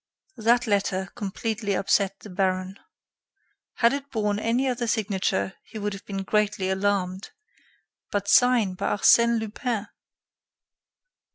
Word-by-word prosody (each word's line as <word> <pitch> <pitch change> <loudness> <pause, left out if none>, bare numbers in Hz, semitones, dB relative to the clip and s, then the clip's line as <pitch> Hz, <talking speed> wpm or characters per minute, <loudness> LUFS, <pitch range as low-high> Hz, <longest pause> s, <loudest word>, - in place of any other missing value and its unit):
That 235 +2 +3
letter 195 -2 0
completely 210 0 -3
upset 195 0 +1
the 210 - -11
baron. 185 +1 -1 1.0
Had 235 +1 +3
it 280 0 -4
borne 210 -4 -1
any 235 +5 +1
other 245 -2 -1
signature, 195 -3 0
he 220 - -11
would 205 -1 -2
have 195 - -10
been 195 -1 -4
greatly 205 -2 0
alarmed 190 -1 -1 0.8
but 200 -1 -1
signed 235 -7 +4
by - - -2
Arsène 235 +3 +5
Lupin! 220 0 -3
205 Hz, 120 wpm, -25 LUFS, 195-230 Hz, 1.0 s, Arsène